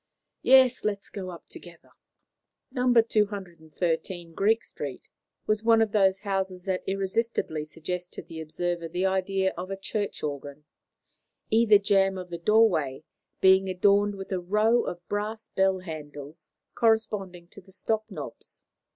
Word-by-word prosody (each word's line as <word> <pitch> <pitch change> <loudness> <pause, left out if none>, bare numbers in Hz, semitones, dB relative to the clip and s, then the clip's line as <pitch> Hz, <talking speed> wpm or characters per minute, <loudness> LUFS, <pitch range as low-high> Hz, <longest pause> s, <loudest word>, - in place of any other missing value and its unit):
Yes; 260 -1 +5
let 210 -1 0
us 200 - -16
go 185 -4 -6
together." 170 -2 -13 0.8
No. 250 -1 +1
213, 180 -6 0
Greek 220 +6 +2
Street, 140 -3 -7 0.4
was 215 0 0
one 225 0 +5
of 220 -2 +2
those 195 -2 +3
houses 190 -3 -2
that 185 -1 -1
irresistibly 195 -5 -1
suggest 175 +3 -5
to - - -7
the 165 -1 -8
observer 170 +2 -3
the 180 +3 -2
idea 190 0 +1
of 180 +2 -6
a 195 - -4
church 205 +1 -3
organ, 145 0 -5 0.9
either 220 -1 +6
jamb 195 -1 +2
of 180 -1 -8
the 170 - -5
doorway 170 -9 +3 0.4
being 190 0 +5
adorned 200 +2 +3
with 195 0 -8
a 185 - 0
row 210 +6 +2
of 175 0 -6
brass 215 +2 -4
bell 190 -1 +1
handles 150 -3 -9 0.2
corresponding 210 -6 0
to 200 - -13
the 190 +1 -20
stop 215 +3 -2
knobs. - - -10
190 Hz, 140 wpm, -27 LUFS, 175-210 Hz, 0.9 s, either